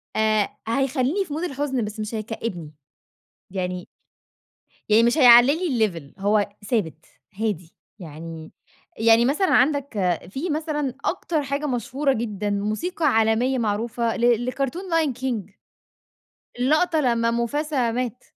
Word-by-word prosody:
آآ، 215 -1 +2 0.2
هيخلّيني 270 - 0
في 300 - -7
mood 315 +3 -3
الحزن 275 -7 -2
بس 210 +1 -7
مش 215 +1 -4
هيكئّبني، 215 -7 -5 0.8
يعني 180 -1 -4 1.0
يعني 215 +2 +5
مش 240 +6 +2
هيعلّي 245 0 +8
لي 230 -6 +2 0.2
الlevel، - - -23
هو 205 0 +2 0.2
ثابت، 170 -9 -1 0.3
هادي. 180 -7 -3 0.2
يعني 160 -2 -9 0.5
يعني 225 +1 +5
مثلًا 300 +9 +1
عندك 250 - +2
في 290 - -4
مثلًا 295 -3 -2
أكتر 330 -4 -1
حاجة 280 +2 -2
مشهورة 270 +2 0
جدًا 210 -4 -3
موسيقى 215 - -1
عالمية 225 +1 +2
معروفة 230 +1 -1
ل 240 0 +2
لكرتون 275 +6 -2
Lion 330 -6 +1
King، 230 -7 -3 1.1
اللقطة 310 +6 +2
لمّا 235 -4 +2
موفاسا 250 +2 0
مات. 250 0 -3
235 Hz, 125 wpm, -23 LUFS, 215-280 Hz, 1.1 s, هيعلّي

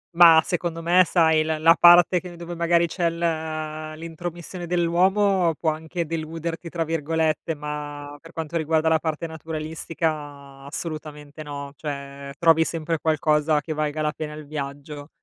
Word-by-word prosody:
Mah, 165 -2 +8
secondo 170 -1 -3
me 180 +2 +5
sai, 160 -3 +3
l 155 0 -2
la 165 +1 +7
parte 175 +1 +7
che 180 0 -10
dove 170 0 -7
magari 170 0 +2
c'è 170 0 0
l 170 - -7
uhm, 155 -1 -3
l'intromissione 170 +2 -7
dell'uomo 180 +1 +2
può 160 +1 0
anche 160 +2 -4
"deluderti" 165 +1 -5
tra 165 0 -2
virgolette, 160 0 -1
ma 145 -1 -6
per 165 - -14
quanto 160 0 -6
riguarda 160 0 +1
la 160 0 +3
parte 160 0 -3
naturalistica 155 -3 -5
assolutamente 150 -1 -7
no, 140 -1 -7
cioè 140 -1 -6
trovi 165 -1 +5
sempre 165 0 -2
qualcosa 155 -1 +2
che 155 +1 -4
valga 155 0 -2
la 150 - +1
pena 150 -1 -5
il 150 -1 -9
viaggio. 145 0 -7
160 Hz, 155 wpm, -24 LUFS, 150-170 Hz, -, Mah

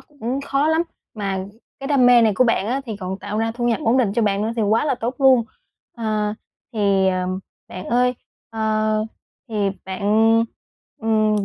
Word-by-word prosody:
cũng 270 -3 -5
khó 280 +2 0
lắm, 320 +1 +3 0.3
mà 200 -3 -2 0.4
cái 270 - -5
đam 270 -3 +4
mê 245 -1 +7
này 220 -3 +3
của 255 - +4
bạn 230 -4 +1
á 255 +5 -1
thì 220 -3 -4
còn 190 -1 -5
tạo 205 +2 -4
ra 225 0 0
thu 240 +1 -1
nhập 230 - +1
ổn 230 +3 +3
định 225 -6 +2
cho 235 - +1
bạn 200 -1 +1
nữa 220 +2 -1
thì 225 - +1
quá 215 +5 +2
là 285 -3 +1
tốt 245 +1 -3
luôn. 260 -4 +5 0.5
À, 215 -2 -1 0.4
thì, 200 -3 +2
à, 185 -1 0 0.4
bạn 185 +1 -7
ơi, 250 +2 +2 0.4
ờ, 215 -1 0 0.4
thì 205 -3 0
bạn, 190 -1 -6 1.0
ừm, 215 -2 +2
220 Hz, 190 wpm, -21 LUFS, 205-245 Hz, 1.0 s, mê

